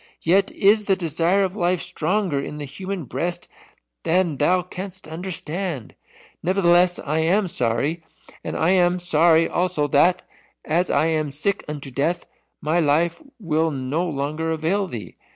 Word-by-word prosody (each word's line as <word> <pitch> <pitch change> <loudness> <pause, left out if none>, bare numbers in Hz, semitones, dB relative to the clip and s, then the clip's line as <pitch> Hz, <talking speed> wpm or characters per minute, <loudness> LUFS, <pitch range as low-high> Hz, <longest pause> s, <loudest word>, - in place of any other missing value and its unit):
Yet 190 +4 +3
is 210 +2 +3
the 195 - +3
desire 170 +3 +1
of 190 0 -2
life 180 -2 +1
stronger 175 -2 -1
in 150 +2 -5
the 150 - -5
human 185 +6 -5
breast 170 +8 -3 0.5
than 170 -2 +1
thou 180 +6 +2
canst 185 0 -8
understand. 165 - -5 0.5
Nevertheless 180 -1 +3
I 155 +2 -2
am 185 +5 +2
sorry, 140 +4 -1 0.4
and - - -4
I 165 +3 +2
am 180 -1 +3
sorry 165 -1 +3
also 175 -4 0
that, 175 +6 +3 0.4
as 170 +3 +1
I - - +3
am 155 -2 0
sick 170 +8 -1
unto 145 -2 -6
death, 160 +7 -1 0.4
my 160 +3 +1
life 165 - +1 0.2
will 165 -4 +1
no 145 +5 -2
longer 155 +3 -2
avail 165 +5 0
thee. 110 - -7
170 Hz, 150 wpm, -22 LUFS, 150-185 Hz, 0.5 s, Yet